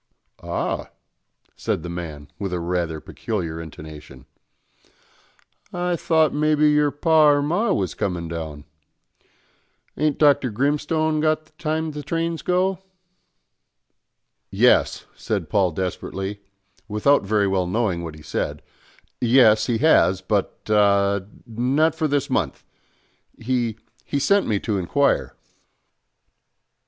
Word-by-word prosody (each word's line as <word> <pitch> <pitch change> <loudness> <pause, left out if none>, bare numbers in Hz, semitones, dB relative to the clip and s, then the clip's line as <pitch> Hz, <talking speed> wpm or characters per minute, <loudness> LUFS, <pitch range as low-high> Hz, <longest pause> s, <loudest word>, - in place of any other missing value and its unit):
"Ah," - - -3 0.7
said 80 - -2
the - - -5
man, 80 -4 -6
with 100 -2 -3
a 90 - -1
rather 85 -2 -2
peculiar 85 -4 -4
intonation, 75 -4 -11 1.5
"I 180 0 -1
thought 160 -1 +2
maybe 150 0 +3
your 150 0 +3
par 150 0 +4
or - - +1
mar 175 +10 +1
was 95 -3 -1
comin' 90 -4 -3
down. 80 -3 -6 1.3
Ain't 150 -1 0
Dr. 145 -4 +4
Grimstone 150 +6 0
got 155 0 +1
the - - -28
times 160 0 -2
the 150 - -5
trains 165 +3 -2
go?" 185 +1 +1 1.7
"Yes," - - +3
said - - -3
Paul 95 -3 +3
desperately, 95 +3 -4 0.5
without 115 +7 +3
very 100 +1 +1
well 95 -2 0
knowing 95 -4 -1
what 80 -2 -7
he 75 - -14
said, - - -3 0.6
"yes, 115 -3 +5
he 120 -3 +1
has, 110 - +4
but 100 +1 -2
ah, 100 -1 +3 0.3
not 130 +7 +1
for 160 -1 -1
this 145 -2 0
month; - - -2 0.7
he 120 -2 -1 0.3
he 145 - -3
sent 200 +8 +2
me 105 -3 +1
to 105 -4 -1
inquire." 140 +11 +1
115 Hz, 120 wpm, -22 LUFS, 90-150 Hz, 1.7 s, yes